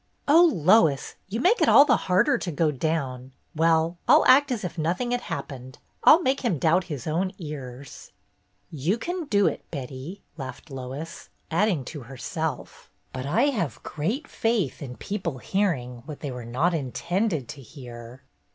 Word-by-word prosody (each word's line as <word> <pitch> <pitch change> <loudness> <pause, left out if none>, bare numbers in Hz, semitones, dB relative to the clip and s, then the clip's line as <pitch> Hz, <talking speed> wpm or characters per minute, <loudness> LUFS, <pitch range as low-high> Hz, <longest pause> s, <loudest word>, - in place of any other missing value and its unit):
" - - -43
Oh, 335 +4 +7
Lois, 165 -5 +3 0.2
you 220 +4 -3
make 380 - +3
it - - +4
all 280 - +8
the 255 -4 +4
harder 185 -1 +2
to 175 - -4
go 155 0 +1
down. 135 -3 -3 0.2
Well, 165 +1 +2
I'll - - +6
act 275 +2 +6
as 230 -4 -2
if 175 -3 -4
nothing 175 +9 -1
had 245 0 0
hap 140 -9 -5
pened. 130 -1 -9 0.3
I - - +9
'll 340 +3 +3
make 265 +1 +1
him 225 - 0
doubt 170 +5 +2
his 145 -8 -6
own 175 +5 -1
ears! 140 -5 -9 0.3
" - - -43 0.2
"You 200 +5 +3
can 350 +7 -4
do 205 -7 +2
it, - - -1
Betty," 140 +6 -7
laughed 135 +2 -8
Lois, 135 +5 -7 0.2
add 205 +7 +3
ing 155 -10 -1
to 150 +1 -7
herself: 135 +4 -5 0.2
"But 130 +1 -4
I 275 - +3
have 180 - -3
great 215 - -3
faith 225 - -1
in 125 -3 -7
people 185 -8 -4
hearing 125 -8 -1
what 150 -2 -8
they 145 - -4
were 125 -2 -7
not 140 +10 0
intended 165 - -1
to 140 - -8
hear 120 0 -11
160 Hz, 180 wpm, -25 LUFS, 135-205 Hz, 0.3 s, I